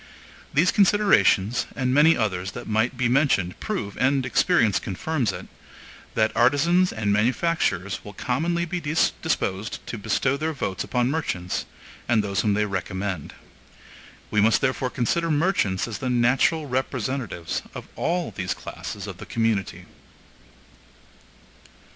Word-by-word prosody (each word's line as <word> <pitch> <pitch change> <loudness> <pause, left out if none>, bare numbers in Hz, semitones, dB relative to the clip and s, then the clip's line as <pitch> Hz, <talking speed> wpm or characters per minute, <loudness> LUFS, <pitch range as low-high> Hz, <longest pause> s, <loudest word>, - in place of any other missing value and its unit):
These 170 +5 +3
considerations, 195 - +3
and 130 -1 0
many 150 +4 +5
others 95 -4 -2
that - - -7
might 110 +4 0
be 125 -1 +1
mentioned 120 - +1
prove, 105 - -4
and 135 0 +2
experience 120 - +3
confirms 130 - -2
it, - - -8 0.7
that 110 0 +1
artisans 165 +9 +3
and 105 -2 0
manufacturers 105 - 0
will 105 - -9
commonly 170 - -1
be 175 +1 -3
disposed 110 - -1
to 115 - -6
bestow 130 +6 0
their 160 +2 -2
votes 95 -9 -3
upon 125 +1 0
merchants 95 - -2 0.4
and 110 -3 +3
those 100 -1 0
whom 105 -2 +1
they 105 +1 +1
recommend. 95 -3 -4 1.0
We 105 - +3
must 110 0 +4
therefore 130 -1 0
consider 165 +8 0
merchants 150 - +1
as 110 -4 -5
the 130 - -2
natural 125 +6 +2
representatives 130 - -3
of - - -7
all 175 +1 -1
these 95 -1 -3
classes 100 -1 -7
of 100 -3 -7
the - - -10
community. 115 -4 -1
120 Hz, 135 wpm, -24 LUFS, 100-150 Hz, 1.0 s, many